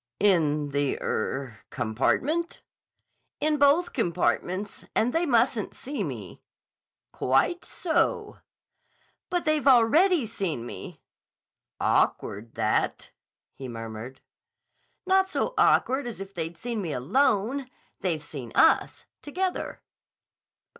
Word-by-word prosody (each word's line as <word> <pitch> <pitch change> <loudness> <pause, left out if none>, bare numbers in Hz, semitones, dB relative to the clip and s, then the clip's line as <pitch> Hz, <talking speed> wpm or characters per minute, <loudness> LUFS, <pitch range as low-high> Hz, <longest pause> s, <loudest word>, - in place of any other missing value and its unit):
"In 155 -7 +2
the—er—compartment?" 135 - -1 0.8
"In 305 0 +1
both 290 +5 +4
compartments. 185 -1 -1
And 240 +3 +2
they 335 +1 +1
mustn't 235 -3 +1
see 270 -4 -4
me." 115 - -7 0.7
"Quite 135 - +1
so." 330 -3 -1 0.9
"But 355 -2 -1
they've 310 -2 +1
already 280 +6 +5
seen 190 - -3
me." - - -9 0.8
"Awkward, 110 +3 0
that," - - 0 0.4
he 135 - -8
murmured. 115 +2 -7 0.8
"Not 380 0 +3
so - - -1
awkward 265 0 +3
as 235 - -6
if 195 0 -8
they'd 165 -1 -4
seen 230 +3 -3
me 165 -6 -3
alone. 245 - +1 0.3
They've 165 -5 -1
seen 130 -8 -8
us. - - +3 0.2
Together." 365 +5 -3
210 Hz, 100 wpm, -26 LUFS, -, 0.9 s, already